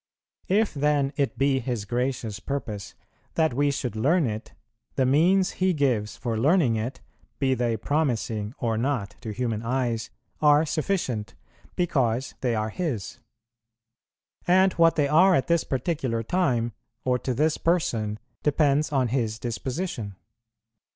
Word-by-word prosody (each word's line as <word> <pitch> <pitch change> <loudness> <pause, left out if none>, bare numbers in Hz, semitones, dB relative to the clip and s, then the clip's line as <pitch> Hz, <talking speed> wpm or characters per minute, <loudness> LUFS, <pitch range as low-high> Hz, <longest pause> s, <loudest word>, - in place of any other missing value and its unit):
If 210 +3 +2
then 145 -1 +1
it 140 -3 -1
be 135 0 +2
His 120 -4 -3
gracious 120 -3 -2
purpose 105 -3 -5 0.4
that 160 -5 +2
we 145 +3 +2
should 135 -5 -3
learn 150 +9 +2
it, 110 -1 -4 0.4
the 130 - +2
means 175 +8 +3
He 185 0 +1
gives 125 -8 0
for 115 -3 -2
learning 145 -2 +3
it, 115 +4 -4 0.4
be 135 -2 +2
they 120 -2 0
promising 115 -5 -1
or 115 -2 -1
not 115 -6 -1
to 110 - -6
human 115 -1 -2
eyes, 120 -1 -1 0.3
are 150 +1 +5
sufficient, 140 - -2 0.4
because 130 -8 0
they 120 -3 +1
are 110 0 -1
His. 130 - -3 1.3
And 185 +1 +5
what 165 0 +4
they 145 -2 +2
are 180 +6 +5
at 135 - +1
this 170 -1 +2
particular 130 -4 -2
time, 120 -6 +1 0.3
or 125 -1 +2
to 130 0 -2
this 155 +4 +1
person, 115 -11 0 0.2
depends 150 0 +2
on 130 -4 +1
His 115 -3 -1
disposition. 120 - -4
130 Hz, 140 wpm, -26 LUFS, 115-155 Hz, 1.3 s, are